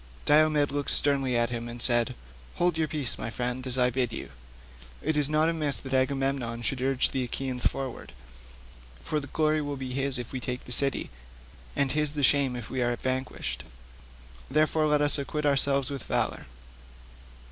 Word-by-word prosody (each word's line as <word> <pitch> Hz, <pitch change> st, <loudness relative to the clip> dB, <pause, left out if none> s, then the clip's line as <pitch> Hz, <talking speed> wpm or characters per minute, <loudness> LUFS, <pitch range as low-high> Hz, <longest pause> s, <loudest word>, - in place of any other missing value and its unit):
Diomed 150 Hz, -1 st, +4 dB
looked 145 Hz, 0 st, -2 dB
sternly 135 Hz, -4 st, +2 dB
at 120 Hz, 0 st, +1 dB
him 120 Hz, 0 st, -4 dB
and 120 Hz, +1 st, -7 dB
said, 120 Hz, -1 st, +2 dB, 0.4 s
"Hold 175 Hz, -1 st, +1 dB
your 160 Hz, -1 st, 0 dB
peace, 150 Hz, -5 st, -3 dB
my -, -, -4 dB
friend, 125 Hz, +2 st, -3 dB
as 130 Hz, 0 st, -2 dB
I 125 Hz, 0 st, +3 dB
bid 125 Hz, -1 st, 0 dB
you. -, -, -7 dB, 0.7 s
It 155 Hz, +1 st, -1 dB
is 150 Hz, -1 st, +2 dB
not 155 Hz, +1 st, +3 dB
amiss 155 Hz, -4 st, 0 dB
that 135 Hz, -1 st, -7 dB
Agamemnon 130 Hz, -3 st, 0 dB
should 130 Hz, +1 st, 0 dB
urge 135 Hz, 0 st, +2 dB
the 130 Hz, -, -1 dB
Achaeans 125 Hz, 0 st, -1 dB
forward, 135 Hz, -3 st, -5 dB, 0.9 s
for 155 Hz, -, -1 dB
the 145 Hz, -, -7 dB
glory 155 Hz, +2 st, +1 dB
will 145 Hz, -1 st, -4 dB
be 130 Hz, -1 st, -5 dB
his 135 Hz, 0 st, 0 dB
if 120 Hz, -2 st, -6 dB
we 130 Hz, -, -3 dB
take 125 Hz, 0 st, -4 dB
the -, -, -8 dB
city, 135 Hz, +2 st, +1 dB, 0.6 s
and 140 Hz, -2 st, +2 dB
his 150 Hz, 0 st, 0 dB
the 145 Hz, -2 st, -2 dB
shame 135 Hz, -2 st, +4 dB
if 120 Hz, -3 st, -6 dB
we 130 Hz, -, -3 dB
are 120 Hz, 0 st, +1 dB
vanquished. 130 Hz, +1 st, -3 dB, 0.9 s
Therefore 155 Hz, +2 st, +2 dB
let 150 Hz, -1 st, +3 dB
us 145 Hz, 0 st, +5 dB
acquit 150 Hz, +2 st, -3 dB
ourselves 140 Hz, -1 st, +3 dB
with 140 Hz, -2 st, -4 dB
valour." -, -, -2 dB
135 Hz, 180 wpm, -28 LUFS, 125-145 Hz, 0.9 s, us